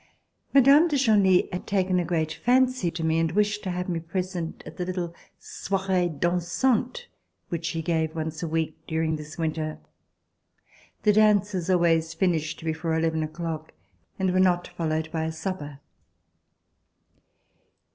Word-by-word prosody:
Mme. 280 +4 +6
de 295 -4 0
Genlis 205 -8 +4
had 180 - -5
taken 185 -2 +1
a - - +1
great 160 -2 -1
fancy 255 -2 +2
to 165 0 -5
me, 160 0 +2
and 165 -1 +1
wished 210 +1 +1
to 190 - -4
have 180 0 -3
me 170 -2 -1
present 175 0 -4
at - - -10
the 180 - -2
little 180 -2 -3 0.2
soirees 185 -4 -2
dansantes 210 - 0 0.4
which 165 -1 -3
she 165 -1 -3
gave 160 -1 0
once 160 -1 -4
a 170 - -2
week 160 -1 -1
during 160 0 0
this 150 +1 -9
winter. 155 -1 -2 1.3
The 210 - +5
dances 205 -4 +3
always 165 -2 +2
finished 165 -2 -1
before 160 0 -1
eleven 160 0 0
o'clock 155 0 -5 0.4
and 190 -1 0
were 185 - +2
not 180 -1 +2
followed 160 -1 -2
by 160 -1 -1
a 160 - -2
supper. 160 -4 -5
170 Hz, 145 wpm, -26 LUFS, 160-190 Hz, 1.3 s, Mme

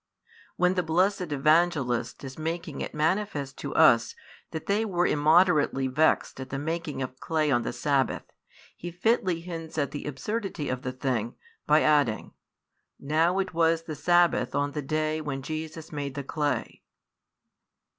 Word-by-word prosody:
When 180 0 +3
the 185 - +1
blessed 180 +1 +1
Evangelist 145 -5 +1
is 135 -1 -7
making 160 -1 -4
it - - -5
manifest 155 -4 -1
to 140 - -5
us 120 -8 +5 0.3
that 160 -1 -6
they 205 +2 +1
were 180 -5 0
immoderately 150 -2 +3
vexed 140 +1 +1
at 130 - -7
the 135 - -3
making 155 -2 -3
of 130 0 -7
clay 155 -2 0
on 120 -2 +3
the - - -3
sabbath, 135 +2 0 0.5
he 175 - -7
fitly 180 -1 0
hints 165 -2 -7
at 140 -2 0
the 145 - -6
absurdity 180 - -3
of 130 -1 -2
the 125 - -3
thing, 125 -3 -2 0.3
by 150 +1 +5
adding: 145 -7 +2 0.7
Now 160 +6 +1
it 190 -1 -1
was 165 0 +2
the 160 - -6
sabbath 170 -4 +2
on 145 0 0
the 150 - -3
day 155 +2 -1
when 135 -3 -4
Jesus 155 +2 -6
made 140 -3 -4
the 140 - -4
clay. 145 -3 -2
155 Hz, 155 wpm, -27 LUFS, 140-170 Hz, 0.7 s, us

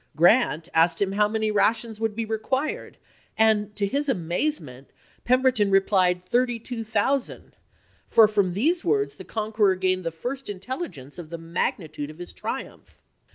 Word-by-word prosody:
Grant 170 - +3
asked 165 +1 +3
him 195 -1 +1
how 205 +1 +3
many 220 0 -1
rations 220 +1 +1
would 220 -2 -1
be 230 0 -2
required, 260 - -3 0.4
and, 215 -1 +2
to 205 -1 0
his 280 +7 -1
amazement, 170 - -2 0.4
Pemberton 255 -4 +3
replied 185 -2 +2
thirty 245 +4 +1
two 230 0 -6
thousand, 225 +5 -1 0.5
for 225 -2 +6
from 200 -4 0
these 330 - +1
words 415 -1 +1
the - - -11
conqueror 215 -3 +1
gained 185 0 0
the 165 - -1
first 250 +12 -6
intelligence 195 - -6
of 165 -3 -9
the 170 - -6
magnitude 165 -2 -3
of 155 - -11
his 175 0 -9
triumph. - - -7
210 Hz, 155 wpm, -25 LUFS, 180-240 Hz, 0.5 s, for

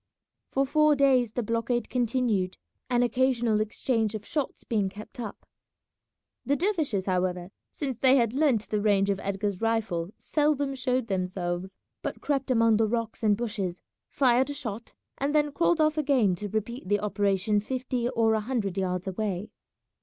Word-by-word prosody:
For 275 +1 +1
four 305 +2 +4
days 260 -5 +3
the 245 - -1
blockade 230 +2 -1
continued, 235 -6 0 0.3
an 245 -1 +3
occasional 240 -3 +2
exchange 220 0 0
of 215 -1 -6
shots 295 -4 -3
being 205 -4 0
kept 210 +5 -11
up. 220 -4 -7 1.0
The 285 - +1
dervishes, 310 - 0
however, 180 -1 -1 0.2
since 265 -5 -4
they 265 0 +6
had 235 -4 +2
learnt 265 -7 +2
the 210 -1 0
range 200 -1 +3
of 195 - -2
Edgar's 200 0 -2
rifle, 220 -7 0
seldom 290 -2 0
showed 255 -2 0
themselves, 185 -2 -3 0.2
but - - -4
crept 275 -2 -1
among 230 -3 +4
the 220 0 +2
rocks 230 +1 -2
and 210 -2 +3
bushes, 205 -6 -3 0.3
fired 260 0 +3
a 285 - -4
shot, 235 -5 -6 0.2
and 285 +2 0
then 295 -1 +3
crawled 335 +3 +2
off 310 0 +3
again 265 -10 +3
to 205 +3 -5
repeat 220 0 -4
the 205 0 +3
operation 205 0 +1
fifty 250 +1 -2
or 225 -3 +2
a 220 - +2
hundred 210 -5 -2
yards 180 -1 -1
away. 195 0 -3
225 Hz, 160 wpm, -27 LUFS, 200-260 Hz, 1.0 s, they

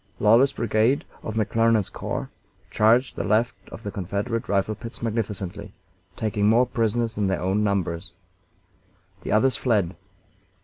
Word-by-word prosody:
Lawler's 115 +6 +5
brigade, 115 +4 +1 0.2
of 110 - -5
McClernand's 115 -1 +2
corps, - - -4 0.4
charged 115 +4 +3
the - - -2
left 110 +4 +2 0.2
of - - -9
the 100 - -4
Confederate 100 +5 -3
rifle 100 +1 +1
pits 115 +2 -9
magnificently, 105 -3 -3 0.4
taking 105 -2 0
more 120 +3 +5
prisoners 115 -1 0
than 105 -2 0
their 95 - 0
own 95 +3 0
numbers. 90 -4 -1 1.1
The - - -5
others 125 +3 +3
fled. 100 -5 +1
110 Hz, 135 wpm, -24 LUFS, 100-115 Hz, 1.1 s, Lawler's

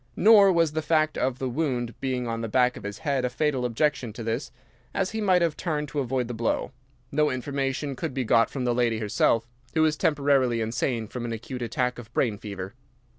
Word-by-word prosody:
Nor 205 -1 +7
was 165 -3 +3
the 155 +1 -1
fact 155 -1 +2
of 130 -1 0
the 130 - -2
wound 125 -4 -1
being 130 -2 -1
on 115 0 -2
the 115 - -2
back 125 +2 +3
of - - -8
his 100 0 -6
head 140 -4 -1
a 125 - +1
fatal 130 -1 0
objection 125 0 0
to 115 - -7
this, 115 +5 -3 0.4
as 190 -1 0
he 220 +1 -3
might 185 -4 +4
have 165 -3 +1
turned 150 -4 -2
to 145 - -2
avoid 130 -2 -1
the 120 - -4
blow. 115 +2 -1 0.4
No 150 +1 +2
information 135 +2 -2
could - - -3
be 130 - 0
got 115 0 +3
from 130 -3 -3
the 120 - +2
lady 120 -2 +1
herself, 110 +2 +1 0.3
who 160 - +4
was 155 -1 +3
temporarily 140 -7 +2
insane 115 0 -1
from 125 +3 -6
an 120 - -3
acute 125 +3 -6
attack 125 0 -1
of 115 -2 -11
brain 110 -5 +1
fever. 100 -3 -6
130 Hz, 220 wpm, -26 LUFS, 115-150 Hz, 0.4 s, Nor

